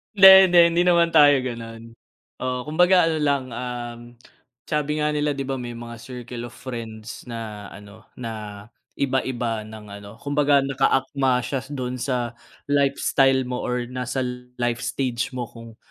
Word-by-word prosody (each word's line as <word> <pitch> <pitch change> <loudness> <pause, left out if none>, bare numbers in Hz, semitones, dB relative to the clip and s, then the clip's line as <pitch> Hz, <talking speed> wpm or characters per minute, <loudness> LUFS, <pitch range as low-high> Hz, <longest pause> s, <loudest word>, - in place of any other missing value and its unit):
Hindi, 190 -1 +10 0.2
hindi, 175 -1 +6
hindi 175 - +3
naman 170 -1 +4
tayo 145 -2 +7
gano'n. 115 -3 -6 0.6
Oo, 125 0 -2
kumbaga 180 +3 +4
ano 165 -1 0
lang, 140 -2 +1
um, 120 -1 -5 0.7
sabi 150 0 -1
nga 150 0 0
nila 150 -1 -1
'di 135 - -3
ba 135 - -3
may 120 -1 -6
mga 115 0 -8
circle 120 -1 -7
of 120 - -17
friends 115 -3 -7
na 110 -3 -7
ano, 105 +2 -14
na 105 -4 -7 0.3
iba 135 -1 +1
iba 120 -4 -3
ng 110 0 -11
ano, 100 0 -10
kumbaga 145 0 +2
naka 135 0 +1
akma 135 -2 +1
siya 135 -2 -2
dun 125 -3 -4
sa 125 -3 -2 0.3
lifestyle 135 -2 +2
mo 125 0 -4
or 125 0 -2
nasa 125 +1 -3 0.3
life 120 0 -1
stage 125 -2 -2
mo 125 -3 -4
kung 115 -1 -13
125 Hz, 160 wpm, -23 LUFS, 115-140 Hz, 0.7 s, Hindi